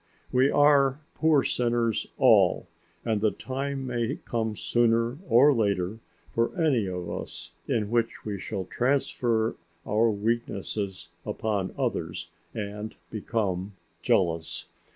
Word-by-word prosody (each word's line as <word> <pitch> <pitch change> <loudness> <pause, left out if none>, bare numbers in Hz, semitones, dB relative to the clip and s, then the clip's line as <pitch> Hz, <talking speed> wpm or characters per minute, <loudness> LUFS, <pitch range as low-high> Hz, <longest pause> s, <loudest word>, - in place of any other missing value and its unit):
We 130 +2 +4
are 145 -2 +4
poor 155 -4 +3
sinners 120 -2 0
all, - - +5 0.4
and 110 -3 0
the 110 - +4
time 135 +3 -4
may 120 -2 -1
come 110 -2 -1
sooner 115 +4 +1
or 140 +5 +7
later 100 -3 0 0.3
for 115 +11 0
any 135 - +2
of 90 -2 -4
us - - -5
in 110 -2 0
which 115 -1 0
we 105 -2 -3
shall 95 -2 -4
transfer 120 -2 0 0.3
our 110 +2 +3
weaknesses 105 -3 -2
upon 100 -4 -2
others - - -2 0.2
and 105 0 -5 0.2
become 100 -3 -2 0.3
jealous. 85 -3 +1
115 Hz, 115 wpm, -27 LUFS, 105-125 Hz, 0.4 s, or